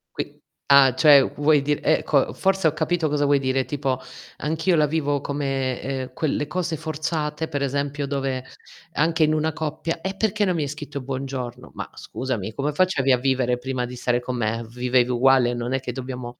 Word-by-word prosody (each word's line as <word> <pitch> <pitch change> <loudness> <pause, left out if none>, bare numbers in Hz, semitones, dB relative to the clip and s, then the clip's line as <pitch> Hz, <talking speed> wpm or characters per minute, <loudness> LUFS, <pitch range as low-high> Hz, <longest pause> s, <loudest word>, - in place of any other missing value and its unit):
Qui - - -4 0.3
Ah, 140 -2 +7
cioè 145 -2 +7 0.2
vuoi 145 0 +4
di 145 +1 0
ecco, 150 -2 +2
forse 190 -3 +2
ho 150 - +1
capito 160 +1 0
cosa 145 -1 0
vuoi 145 0 +3
dire, 130 0 0
tipo 135 -2 -2 0.4
anch'io 160 +4 +1
la 155 -2 +4
vivo 145 -2 0
come, 135 -2 -2
uhm, - - -28
quel 150 +1 -1
cose 175 +1 -2
forzate, 155 0 -3
per 145 -2 -3
esempio, 140 +1 -1
dove 135 -2 -2 0.5
anche 160 +2 +2
in 155 0 +3
una 155 0 0
coppia: 155 +2 -3
"E 190 +2 -4
perché 215 0 +1
non 185 -3 +1
mi 160 - 0
hai - - -2
scritto 145 0 -6
buongiorno?" 130 -2 -5
Ma - - -6
scusami, 115 -5 -4
come 145 +5 -2
facevi 145 -6 +2
a - - +4
vivere 125 -1 +1
prima 125 0 -3
di 125 - -8
stare 120 0 0
con 125 +1 -4
me? 115 0 -1
Vivevi 125 +1 +1
uguale, 125 0 +4
non 120 +1 -3
è 135 - +1
che 125 -1 -5
dobbiamo 125 -1 -6
140 Hz, 190 wpm, -23 LUFS, 130-155 Hz, 0.5 s, Ah